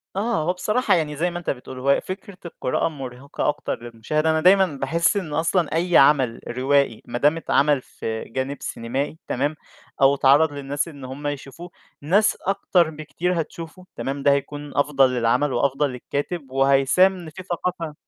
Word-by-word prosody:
آه، 210 -5 0
هو 180 +3 0
بصراحة 215 +5 +1
يعني 150 -3 -1
زي 175 +4 0
ما 175 - -4
أنت 175 - -5
بتقول، 130 0 -5
هو 140 +2 +3
فكرة 185 0 -8
القراءة 160 -4 -1
مُرهقة 135 -1 -4
أكتر 145 -5 -3
للمشاهد، 120 +7 -2
أنا 160 0 +2
دايمًا 190 +2 +6
باحس 165 +6 0
إن 160 -6 -4
أصلًا 165 0 0
أي 175 +1 +3
عمل 135 -4 +4
روائي 135 -1 +1
ما 120 - -4
دام 150 +5 +3
اتعمل 145 -3 +2
في 110 -2 -5
جانب 130 +3 -4
سينمائي 135 +7 -3
تمام، 145 +4 -1 0.5
أو 135 +1 +6
اتعرض 145 +3 +4
للناس 140 +3 -3
إن 140 -5 -10
هم 140 +3 -6
يشوفوه، 145 +5 -6 0.3
ناس 200 +9 +2
أكتر 185 -3 +1
بكتير 165 +3 -2
هتشوفه 165 +3 -9
تمام، 135 +1 -4
ده 140 - +5
هيكون 145 +1 -3
أفضل 140 -2 +3
للعمل 125 +3 +1
وأفضل 140 +1 +1
للكاتب 140 +3 -5
وهيساهم 140 +7 +3
في 185 +4 -10
ثقافة 175 -3 -3
145 Hz, 165 wpm, -23 LUFS, 135-170 Hz, 0.5 s, دايمًا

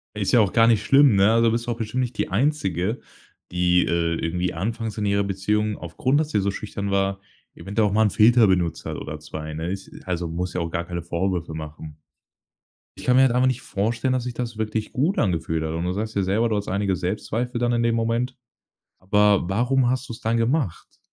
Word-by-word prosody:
Ist 100 +1 -1
ja 120 - +7
auch 100 - +1
gar 115 -1 +5
nicht 110 -2 +3
schlimm, 135 -3 +5
ne? 100 +3 +5
Also, 115 0 +3
da - - +3
bist 115 +1 -2
du - - 0
auch 115 - -4
bestimmt 120 +3 -2
nicht 125 -1 -3
die - - 0
Einzige, 105 - 0 0.5
die, 90 0 +3
äh, 85 -1 0
irgendwie 90 +2 -2
anfangs 110 +5 -3
in 105 - -1
ihrer 100 0 +2
Beziehung 105 +2 -1
aufgrund, 125 - 0
dass 155 0 -1
sie 105 - +1
so 100 0 0
schüchtern 100 -1 -5
war, 100 0 0 0.3
eventuell 105 +2 0
auch 100 - -2
mal 110 - +3
'n 105 - +3
Filter 115 +2 +5
benutzt 85 -3 0
hat - - -4
oder 75 0 -6
2, 80 0 -7
ne? 80 +3 -3
Ist 95 0 -6 0.2
also 90 -2 -2
muss 90 +2 -3
ja 90 - -2
auch 85 - -3
gar 85 +1 -2
keine 85 -1 -4
Vorwürfe 85 -1 -2
machen. 75 -1 -8 1.0
Ich - - -9
kann 125 - +4
mir 130 - +6
halt 135 -2 +5
einfach 125 +1 +3
nicht 130 0 -1
vorstellen, 115 +6 -1
dass 125 -2 -1
sich 125 -1 -4
das 120 -2 -5
wirklich 110 0 -3
gut 155 +10 0
angefühlt 80 -4 0
hat. 80 - -3
Und 85 +2 -2
du 90 - -1
sagst 110 +2 -4
ja 100 - +1
selber, 110 +5 +1
du 105 - 0
hast 100 - -4
einige 100 -1 0
Selbstzweifel 110 +7 -3
dann 120 0 +1
in 120 0 +1
dem 115 0 +2
Moment. 115 +3 -1 0.6
Aber 100 -1 +3
warum 120 +5 +2
hast 130 +1 -2
du's 115 0 -7
dann 115 0 0
gemacht? 115 - -1
105 Hz, 230 wpm, -23 LUFS, 90-115 Hz, 1.0 s, ja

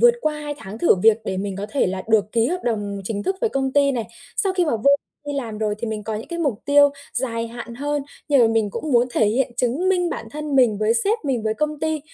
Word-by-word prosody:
vượt 480 0 +7
qua 300 -1 -1
2 295 0 -4
tháng 200 +4 -8
thử 345 - +5
việc 225 0 +6
để 190 - -2
mình 195 0 -3
có 200 +1 -4
thể 280 - +2
là 185 0 -3
được 215 -1 +3
ký 230 -1 +3
hợp 360 +6 -2
đồng 205 -4 -2
chính 205 -1 -3
thức 380 - -1
với 465 - +1
công 265 -1 -1
ty 280 -1 +4
này. 235 -3 -2 0.3
Sau 390 -2 +1
khi 365 -1 +2
mà 295 -8 +1
vô 255 +6 +3 0.4
đây 290 - -3
làm 230 -6 -4
rồi 215 -1 0
thì 235 - -3
mình 220 -1 -3
có 220 - -3
những 215 - -6
cái 340 - -4
mục 280 -10 -1
tiêu 285 0 +6 0.2
dài 230 -3 -1
hạn 235 0 -8
hơn, 290 +2 -2 0.3
nhưng 280 -3 +5
mà 230 - +6
mình 220 -2 +1
cũng 300 +7 -4
muốn 240 +1 +4
thể 220 - +2
hiện, 245 +4 +1
chứng 260 +8 0
minh 355 -2 +2
bản 225 - -5
thân 300 -1 -3
mình 230 -6 +4
với 215 +1 +2
sếp 410 - +2
mình, 255 -5 0
với 220 0 0
công 300 -1 -2
ty, 315 -1 -1
245 Hz, 275 wpm, -22 LUFS, 220-295 Hz, 0.4 s, vượt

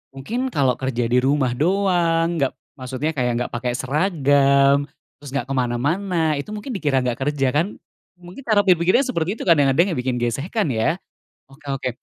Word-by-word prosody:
mungkin 230 - -3
kalau 135 - 0
kerja 130 -2 -1
di 125 - +4
rumah 135 0 +1
doang 170 +1 +1
nggak, 135 -2 0 0.2
maksudnya 130 +4 -3
kayak 125 -5 -1
nggak - - -7
pakai 120 0 -2
seragam, 140 -1 +2 0.3
terus 140 -2 -9
nggak 135 0 -3
kemana-mana 150 +6 0
itu 140 - -6
mungkin 210 +6 -6
dikira 145 - 0
nggak 125 -2 -2
kerja 135 -3 +1
kan? 165 +9 -1 0.4
Mungkin 180 +5 -13
cara 210 -2 +4
berpikirnya 185 +6 +3
seperti 190 - -2
itu - - -7
kadang-kadang 165 +2 +3
yang 160 - -2
bikin 125 0 -1
gesekan 140 - -1
ya, 115 +8 +1 0.5
oke 135 +3 -20
oke, 135 -1 -2
145 Hz, 165 wpm, -21 LUFS, 130-175 Hz, 0.5 s, di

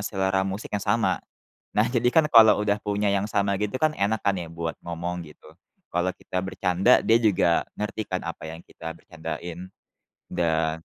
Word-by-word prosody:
selera 95 -2 0
musik 95 +2 -4
yang 105 - 0
sama. 115 +2 +1 0.5
Nah, 105 +2 +2
jadikan 125 +6 +3
kalau 115 -7 +7
udah 105 -1 +2
punya 105 0 0
yang 100 0 +1
sama 100 -2 +1
gitu 105 +5 -2
kan 155 -1 +2
enak 100 +2 0
kan 100 -1 +1
ya 85 -3 -6
buat 85 0 -4
ngomong, 85 +1 -4
gitu. 75 -2 -15 0.4
Kalau 90 +2 0
kita 90 0 -4
bercanda 95 +4 +3
dia 115 - +3
juga 90 -6 +3 0.2
ngerti 105 +1 -2
kan - - -3
apa - - -6
yang 80 - -9
kita 80 0 -7
bercandain. 90 +2 -7 0.6
Dan 80 -2 0
95 Hz, 170 wpm, -25 LUFS, 85-105 Hz, 0.6 s, kalau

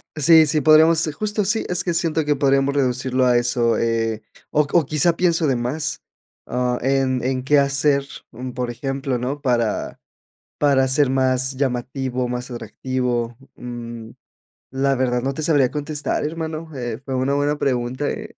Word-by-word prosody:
Sí, 160 +1 +6
sí, 150 0 +2
podríamos, 160 +2 +5
eh, 155 - -3
justo, 210 +6 -2
sí, 210 +3 0
es 180 0 0
que 175 - -1
siento 165 -2 0
que 145 0 +2
podríamos 140 0 +2
reducirlo 130 -1 0
a 125 -1 +4
eso, 120 -1 +1
eh, 115 -1 -1 0.3
o 150 - +3
o 170 -4 +4
quizás 155 +4 +2
pienso 170 -1 +1
de 135 -4 +2
más, 125 +6 -2 0.5
ah, 125 0 -1
en 130 -1 +1
en 130 0 -1
qué 145 +1 +4
hacer, 140 0 +2 0.3
mm, 125 +1 -7
por 125 -1 -3
ejemplo, 135 0 -3
¿no?, 135 +4 -4
para 120 -6 -1 0.6
para 140 -2 +3
ser 140 +1 +3
más 130 0 +1
llamativo, 130 -1 -2
más 125 +1 -4
atractivo, 120 0 -3 0.2
mm, 120 -2 -8 0.6
la 135 +1 +1
verdad 125 -1 0
no 135 +1 -1
te 155 - -5
sabría 145 -6 +3
contestar, 150 0 -2
hermano, 160 +1 -4
eh, 120 -2 -4
fue 135 -1 -4
una 130 +2 0
buena 145 +1 0
pregunta, 130 +1 -1
¿eh? - - -7
135 Hz, 165 wpm, -21 LUFS, 125-150 Hz, 0.6 s, Sí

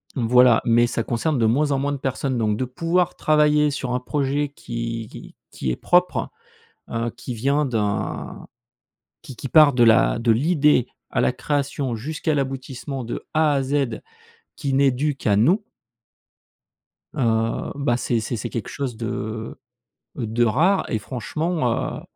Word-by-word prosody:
voilà 125 -1 +5
mais 120 0 +4
ça 115 -1 -2
concerne 130 +6 -1
de 115 - +2
moins 145 +6 +2
en 135 - +1
moins 145 +1 -1
de 140 - -3
personnes, 130 -1 -2
donc 105 -2 0
de 130 - -1
pouvoir 170 +7 0
travailler 150 -1 +3
sur 130 -3 -3
un 125 - 0
projet 140 +2 -1
qui 115 -4 -5
qui - - -12 0.2
qui 65 - -4
est - - -1
propre, 180 0 +2 0.6
heu, 115 0 -2
qui 125 +1 -6
vient 140 +6 +1
d'un 105 -5 -3 0.8
qui 135 -7 -10
qui 135 - -6
part 150 -1 +6
de 120 -1 +5
la 110 0 +4
de 115 0 +3
l'idée 145 0 +3 0.2
à - - 0
la - - +2
création 140 -2 -2
jusqu'à 155 +6 -2
l'aboutissement 135 -1 -4
de 115 - -5
A 155 -1 +3
à 140 -1 +1
Z 135 -2 -1 0.6
qui 140 -4 -3
n'est 135 0 +4
due 145 +3 -1
qu'à 105 -6 +1
nous 175 - +3 1.5
heu, 115 -2 0
bah, 140 -4 0
c'est 120 -2 0
c'est 110 +3 -3
c'est 110 - -4
quelque 115 - -5
chose 135 -5 -4
de 110 0 -5 0.6
de 115 +1 0
rare 170 - +2
et 110 - -1
franchement, 130 - -2
heu, - - -9
130 Hz, 160 wpm, -22 LUFS, 115-145 Hz, 1.5 s, part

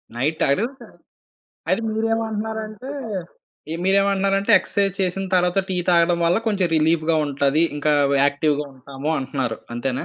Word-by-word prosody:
Night 145 +6 -1
తాగారు. 140 +11 +2 1.0
అయితే, 230 - +1
మీరేమంటున్నారంటే 220 +1 -3 0.8
ఇ - - -2
మీరేమంటున్నారంటే 195 0 +2
exercise 200 -2 -1
చేసిన 190 +1 -1
తర్వాత, 180 +1 +2
టీ 185 - -2
తాగడం 170 0 +4
వల్ల 170 - +3
కొంచెం 200 -4 +1
రిలీఫ్‌గా 160 +1 +2
ఉంటది. 140 +2 +1 0.2
ఇంకా 150 +1 +1 0.3
యాక్టివ్‌‌గా 145 +1 +1
ఉంటాము 135 +3 -6
అంటున్నారు. 130 -4 -3 0.2
అంతేనా? 125 +1 -2
175 Hz, 120 wpm, -22 LUFS, 145-200 Hz, 1.0 s, తాగడం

